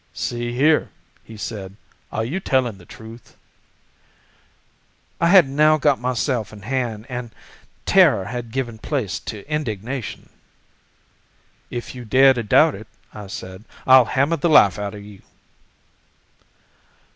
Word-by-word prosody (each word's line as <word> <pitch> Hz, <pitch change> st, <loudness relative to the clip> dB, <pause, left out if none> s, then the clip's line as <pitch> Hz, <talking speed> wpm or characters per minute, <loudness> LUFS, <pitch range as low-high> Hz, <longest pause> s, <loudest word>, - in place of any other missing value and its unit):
'See 120 Hz, 0 st, -3 dB
here,' 150 Hz, +6 st, +2 dB, 0.3 s
he 110 Hz, -, -12 dB
said, 100 Hz, -3 st, -7 dB, 0.4 s
'are 110 Hz, -, -2 dB
you 160 Hz, +11 st, -3 dB
telling 130 Hz, -, 0 dB
the 85 Hz, -, -17 dB
truth?' 110 Hz, +2 st, -13 dB, 1.8 s
"I 170 Hz, -, +2 dB
had 180 Hz, -4 st, +6 dB
now 155 Hz, +3 st, +3 dB
got 145 Hz, -2 st, +2 dB
myself 125 Hz, -2 st, -2 dB
in 105 Hz, -2 st, -13 dB
hand 120 Hz, -3 st, -3 dB
and 125 Hz, -2 st, -6 dB, 0.6 s
terror 95 Hz, -, +4 dB
had 120 Hz, +1 st, -6 dB
given 120 Hz, -2 st, -4 dB
place 120 Hz, -8 st, -3 dB
to 105 Hz, +1 st, -8 dB
indignation. 130 Hz, -4 st, -4 dB, 1.4 s
'If 120 Hz, -1 st, -6 dB
you 125 Hz, -1 st, -9 dB
dare 135 Hz, +4 st, +5 dB
to 120 Hz, -, -3 dB
doubt 105 Hz, -, +4 dB
it,' -, -, -10 dB, 0.3 s
I 105 Hz, -2 st, -9 dB
said, 95 Hz, +1 st, -8 dB, 0.2 s
'I'll 130 Hz, -1 st, +7 dB
hammer 140 Hz, +8 st, 0 dB
the 170 Hz, +3 st, 0 dB
life 105 Hz, -, +5 dB
out 100 Hz, 0 st, -4 dB
of 100 Hz, -, -10 dB
you! 105 Hz, -2 st, -14 dB
120 Hz, 135 wpm, -21 LUFS, 105-135 Hz, 1.8 s, I'll